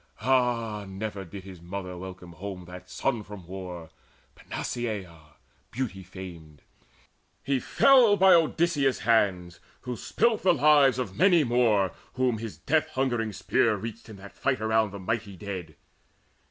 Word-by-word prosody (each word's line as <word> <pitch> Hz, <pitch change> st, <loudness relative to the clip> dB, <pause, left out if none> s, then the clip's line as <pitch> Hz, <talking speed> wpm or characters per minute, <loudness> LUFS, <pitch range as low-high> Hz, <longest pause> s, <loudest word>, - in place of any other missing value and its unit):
Ah, 120 Hz, -5 st, +1 dB
never 100 Hz, +1 st, -5 dB
did 95 Hz, +2 st, -9 dB
his 95 Hz, -3 st, -11 dB
mother 90 Hz, +1 st, -6 dB
welcome 90 Hz, -1 st, -9 dB
home 90 Hz, +1 st, -7 dB
That 90 Hz, +1 st, -11 dB
son 120 Hz, +1 st, -1 dB
from 105 Hz, -4 st, -10 dB
war, 90 Hz, -3 st, -8 dB, 0.4 s
Panaceia 90 Hz, -10 st, -5 dB, 0.3 s
beauty 115 Hz, -7 st, -4 dB
famed! 85 Hz, -5 st, -11 dB, 0.8 s
He 135 Hz, -1 st, +1 dB
fell 245 Hz, -, +5 dB
by 190 Hz, 0 st, +7 dB
Odysseus' 160 Hz, -4 st, +2 dB
hands, 95 Hz, -6 st, +1 dB, 0.2 s
who 125 Hz, -1 st, -5 dB
spilt 225 Hz, -, +1 dB
the 180 Hz, -2 st, +4 dB
lives 145 Hz, -2 st, +5 dB
Of 115 Hz, -7 st, -4 dB
many 175 Hz, -, +5 dB
more 115 Hz, -, +2 dB, 0.2 s
whom 125 Hz, -3 st, 0 dB
his 110 Hz, -8 st, -7 dB
death 155 Hz, -, +1 dB
hungering 120 Hz, -4 st, 0 dB
spear 110 Hz, +2 st, +1 dB
Reached 115 Hz, +3 st, -7 dB
in 110 Hz, -, -9 dB
that 100 Hz, +1 st, -12 dB
fight 130 Hz, -2 st, -1 dB
around 110 Hz, 0 st, +2 dB
the 100 Hz, -, -8 dB
mighty 100 Hz, 0 st, -3 dB
dead. 95 Hz, -3 st, -6 dB
105 Hz, 140 wpm, -27 LUFS, 95-130 Hz, 0.8 s, by